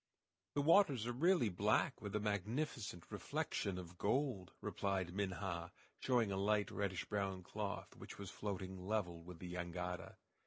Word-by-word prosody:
"The 145 - +3
waters 150 - +6
are 120 - 0
really 150 - +4
black 100 +4 +2
with 105 -1 -3
a - - +3
magnificent 105 - -1
reflection 95 -2 -1
of 90 -1 -8
gold," 130 -10 +1
replied 95 -3 -1
Minha, 95 -3 -2 0.3
showing 120 -5 +3
a 95 - 0
light, 105 +1 +2
reddish 100 -3 -1
brown 95 -2 -1
cloth, 100 0 -4
which - - -9
was 100 -2 -6
floating 95 -2 -4
level 90 -6 0
with 90 +1 -9
the 90 +1 -6
jangada. 90 0 -3
100 Hz, 150 wpm, -40 LUFS, 90-110 Hz, 0.3 s, waters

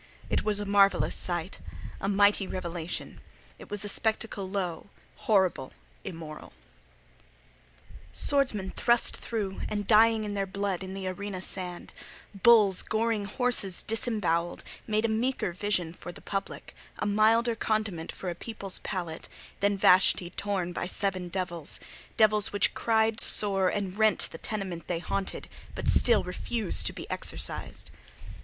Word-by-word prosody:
It - - +1
was 210 -1 0
a 205 - -3
marvellous 200 0 +3
sight: 175 +1 -3 0.4
a 195 - -2
mighty 205 0 +3
revelation. 175 -2 -5 0.4
It - - -12
was 205 0 -2
a - - -3
spectacle 215 -2 -1
low, 185 -4 -3 0.3
horrible, 190 -10 +1 0.3
immoral. 160 -4 -8 1.6
Swordsmen 240 -10 +2
thrust 235 -1 +2
through, 205 -4 -4
and 205 -1 -2
dying 220 +1 +5
in 205 -1 -3
their 195 -1 -1
blood 195 -1 -3
on 190 0 -6
the 195 -1 -4
arena 195 +1 -4
sand; 180 -1 -6 0.4
bulls 205 -2 +5
goring 220 -1 0
horses 205 -4 0
disembowelled, 205 -7 -1 0.2
made 215 0 +1
a - - +3
meeker 225 -2 -1
vision 185 -3 0
for 175 - -9
the - - -13
public—a 195 -1 -6
milder 225 +3 +3
condiment 215 -7 -2
for 190 - -8
a - - -3
people's 200 +1 -4
palate—than 185 +3 -4
Vashti 180 -1 +4
torn 190 -3 -2
by 175 - -3
seven 185 -1 -2
devils: 175 -4 -4 0.4
devils 215 -2 +4
which 205 - +2
cried 225 0 +1
sore 195 -3 +5
and 195 -2 -3
rent 220 -1 +4
the - - -9
tenement 190 -6 -5
they 175 - -1
haunted, 195 +3 -3 0.3
but - - -5
still 235 -4 +5
refused 205 +3 0
to - - -1
be - - -8
exorcised. - - -3
200 Hz, 135 wpm, -28 LUFS, 185-215 Hz, 1.6 s, dying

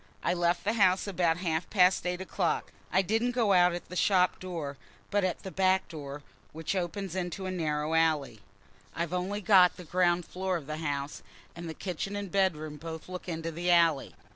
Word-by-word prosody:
I 175 - +2
left 175 0 +1
the 210 - +1
house 190 -4 +3
about 175 -4 +1
half 170 -2 -2
past 185 -2 +4
eight 180 +1 -2
o'clock. 185 -2 -1 0.2
I 190 +2 +3
didn't 225 +5 0
go 225 -5 +3
out 180 -1 +5
at 175 - -7
the 180 - -8
shop 180 -1 +3
door, 165 -6 -5 0.4
but 205 -1 +2
at 185 -2 -1
the 190 - -6
back 190 0 +2
door, 145 -2 -7 0.3
which 160 +4 -3
opens 185 0 -3
into 185 +1 -3
a 185 - -2
narrow 155 -3 -1
alley. 155 -8 +1 0.6
I've 170 +1 -2
only 190 +3 -2
got 190 -3 +6
the 180 - -8
ground 175 0 +1
floor 185 0 -2
of 155 - -9
the 155 +1 -4
house, 145 -2 -3 0.3
and 170 -1 -7
the 160 - -6
kitchen 195 +2 -4
and 200 -3 -4
bedroom 155 -6 0
both 160 +1 -7
look 180 0 -6
into 165 0 -3
the 175 +2 -2
alley. 165 -5 +3
180 Hz, 195 wpm, -29 LUFS, 160-190 Hz, 0.6 s, got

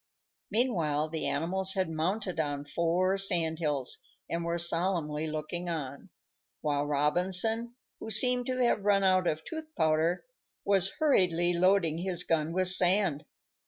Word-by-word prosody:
Meanwhile 170 - 0
the 160 0 -2
animals 190 +6 0
had 190 -1 0
mounted 175 +4 -3
on 145 -2 -3
four 175 +5 0
sand 170 -4 0
hills, 145 -6 -1 0.3
and 170 0 -3
were 170 0 -2
solemnly 165 -3 0
looking 155 +3 -4
on, 140 -5 -6 0.5
while 145 -1 -1
Robinson, 180 +11 +1 0.2
who 220 - -8
seemed 245 +3 +3
to 255 -1 -2
have 215 -4 0
run 200 -1 +2
out 185 -1 +2
of 155 0 -2
tooth 315 -1 -8
powder, 160 - 0 0.4
was 195 -1 +2
hurriedly 175 - +2
loading 175 -2 +2
his 180 -1 +1
gun 160 -2 -1
with 185 +1 +2
sand. 180 -4 +3
175 Hz, 140 wpm, -29 LUFS, 155-195 Hz, 0.5 s, seemed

